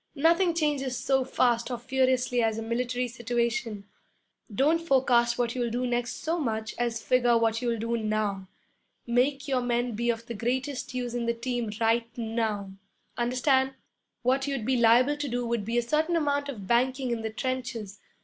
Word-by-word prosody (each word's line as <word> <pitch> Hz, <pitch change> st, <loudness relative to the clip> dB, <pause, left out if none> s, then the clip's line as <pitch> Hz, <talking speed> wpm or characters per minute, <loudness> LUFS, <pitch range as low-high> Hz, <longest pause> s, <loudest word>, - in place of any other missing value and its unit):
Nothing 335 Hz, +4 st, +3 dB
changes 285 Hz, -5 st, 0 dB
so 265 Hz, +1 st, +1 dB
fast 240 Hz, -2 st, +1 dB
or 245 Hz, -, -2 dB
furiously 255 Hz, 0 st, +1 dB
as 225 Hz, -1 st, +1 dB
a 225 Hz, -, -3 dB
military 245 Hz, +2 st, -1 dB
situation. 235 Hz, -3 st, -2 dB, 0.7 s
Don't 300 Hz, +10 st, +2 dB
forecast 255 Hz, -6 st, +3 dB
what 240 Hz, -1 st, 0 dB
you'll 245 Hz, -2 st, -1 dB
do 245 Hz, +2 st, -1 dB
next 240 Hz, -1 st, -2 dB
so 330 Hz, +2 st, 0 dB
much 220 Hz, -6 st, -2 dB
as 235 Hz, -1 st, -1 dB
figure 245 Hz, -2 st, +3 dB
what 225 Hz, 0 st, +1 dB
you'll 235 Hz, -2 st, 0 dB
do 230 Hz, +2 st, -1 dB
now. 215 Hz, -3 st, -1 dB, 0.6 s
Make 270 Hz, +4 st, +1 dB
your 260 Hz, -2 st, +1 dB
men 245 Hz, 0 st, 0 dB
be 235 Hz, +3 st, -1 dB
of 230 Hz, 0 st, -1 dB
the 235 Hz, -, -6 dB
greatest 255 Hz, +4 st, -2 dB
use 245 Hz, -1 st, -3 dB
in 240 Hz, -1 st, -2 dB
the 235 Hz, -, +1 dB
team 240 Hz, -1 st, -2 dB
right 230 Hz, +1 st, +2 dB
now 220 Hz, -4 st, -2 dB, 0.4 s
understand? 260 Hz, +2 st, +1 dB, 0.5 s
What 265 Hz, +2 st, +2 dB
you'd 270 Hz, -6 st, -2 dB
be 260 Hz, -, +2 dB
liable 245 Hz, +5 st, +4 dB
to 290 Hz, 0 st, -3 dB
do 245 Hz, -1 st, -2 dB
would 235 Hz, -2 st, -1 dB
be 230 Hz, +3 st, -2 dB
a 240 Hz, -, +2 dB
certain 310 Hz, +7 st, +1 dB
amount 285 Hz, -3 st, 0 dB
of 215 Hz, -8 st, -6 dB
banking 255 Hz, +3 st, +1 dB
in 235 Hz, -1 st, -1 dB
the 220 Hz, -, -2 dB
trenches. 230 Hz, -4 st, -4 dB
240 Hz, 180 wpm, -27 LUFS, 230-260 Hz, 0.7 s, liable